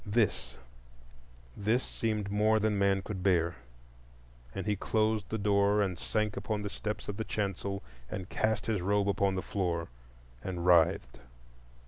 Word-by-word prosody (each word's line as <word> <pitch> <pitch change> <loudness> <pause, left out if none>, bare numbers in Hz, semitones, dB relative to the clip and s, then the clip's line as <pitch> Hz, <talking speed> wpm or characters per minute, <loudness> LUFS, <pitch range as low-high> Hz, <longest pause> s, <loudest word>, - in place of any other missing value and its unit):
—this, 100 - 0 1.0
this 110 +5 +1
seemed 105 -3 -2
more 110 +2 +3
than 110 0 +1
man 100 -1 +3
could 95 -2 -5
bear; 85 -3 +2 1.0
and - - -3
he 105 -1 +1
closed 110 +1 0
the 110 - -1
door, 100 0 +3
and 95 -4 0
sank 105 -1 -1
upon 105 -2 -2
the 105 - -3
steps 105 0 -4
of 105 - -4
the 110 - -1
chancel, 100 -2 -2 0.3
and 95 +5 -5
cast 110 -1 0
his 110 -5 0
robe 100 +2 +2
upon 100 -1 +2
the 95 - -2
floor 85 -4 -1 0.5
and 90 -2 -3
writhed. 80 -8 +4
100 Hz, 150 wpm, -31 LUFS, 95-105 Hz, 1.0 s, writhed